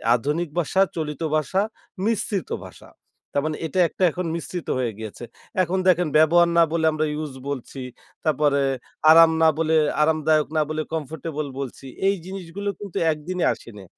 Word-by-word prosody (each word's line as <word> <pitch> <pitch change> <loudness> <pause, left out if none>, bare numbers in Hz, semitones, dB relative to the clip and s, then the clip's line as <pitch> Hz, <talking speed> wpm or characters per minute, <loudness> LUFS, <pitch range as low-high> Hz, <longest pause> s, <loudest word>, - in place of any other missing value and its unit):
আধুনিক 150 +7 -1
ভাষা, 180 +3 +1 0.2
চলিত 150 -1 -4
ভাষা, 155 +6 +1 0.4
মিশ্রিত 210 - -1 0.2
ভাষা। - - -14 0.4
তারমানে 150 +2 -1
এটা 160 - -2
একটা 190 - -3
এখন 180 +3 -4
মিশ্রিত 170 +1 -5
হয়ে 125 -3 0
গিয়েছে। 110 +1 -8 0.4
এখন 180 +2 -1
দেখেন, 180 -2 +4
ব্যবহার 170 +2 +5
না 170 - +7
বলে 165 -1 +1
আমরা 155 0 0 0.2
use 145 -4 -7
বলছি। 135 -1 -5 0.4
তারপরে 145 -2 +2 0.5
আরাম 165 0 +8
না 160 - +6
বলে, 160 0 +2 0.3
আরামদায়ক 155 0 +3
না - - +4
বলে, 155 0 -1
comfortable 155 -1 -4
বলছি। 135 0 -6 0.2
এই 200 - +3
জিনিসগুলো 195 +1 -5
কিন্তু 200 -4 -6
১ 155 - -3
দিনে 180 -1 -1
আসেনি। 105 -4 -12
160 Hz, 155 wpm, -23 LUFS, 150-175 Hz, 0.5 s, আরাম